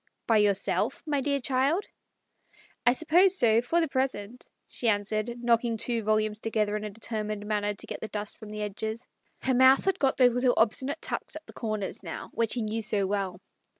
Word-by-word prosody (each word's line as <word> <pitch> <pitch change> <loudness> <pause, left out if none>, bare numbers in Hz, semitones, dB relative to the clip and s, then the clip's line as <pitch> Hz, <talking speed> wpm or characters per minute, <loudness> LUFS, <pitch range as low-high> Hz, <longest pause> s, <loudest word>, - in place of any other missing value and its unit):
" - - -52
By 225 - +6
yourself, 205 -2 +1
my 290 -3 0
dear 280 +1 0
child? 275 +9 +1 0.5
" - - -31
"I 240 - +7
suppose 350 +6 +4
so, 230 -6 +4
for 325 +8 +1
the 325 - +1
present," 255 -4 -3 0.2
she 240 - -3
an 205 -1 +2
swered, 215 +3 -2
knocking 235 -1 +2
two 235 +1 0
volumes 215 0 0
together 215 -2 -1
in 210 - -3
a 210 - -4
determined 215 -1 -4
manner, 210 -1 -1
to - - -8
get - - -7
the 220 - -4
dust 210 -1 -5
from 215 - -10
the 210 0 -4
edges. 220 +3 -4 0.4
Her 260 - +1
mouth 260 +2 +5
had 385 - +1
got 270 -1 +2
those 250 -2 +5
little 245 0 +2
obsti 225 +3 +2
nate 285 +4 -4
tucks 315 - -4
at 315 0 -9
the - - -14
corners 215 -5 -4
now, 165 -4 -7
which 230 0 0
he 240 - -1
knew 215 +1 -2
so 205 -2 0
well. 190 -2 -2
225 Hz, 215 wpm, -28 LUFS, 210-260 Hz, 0.5 s, I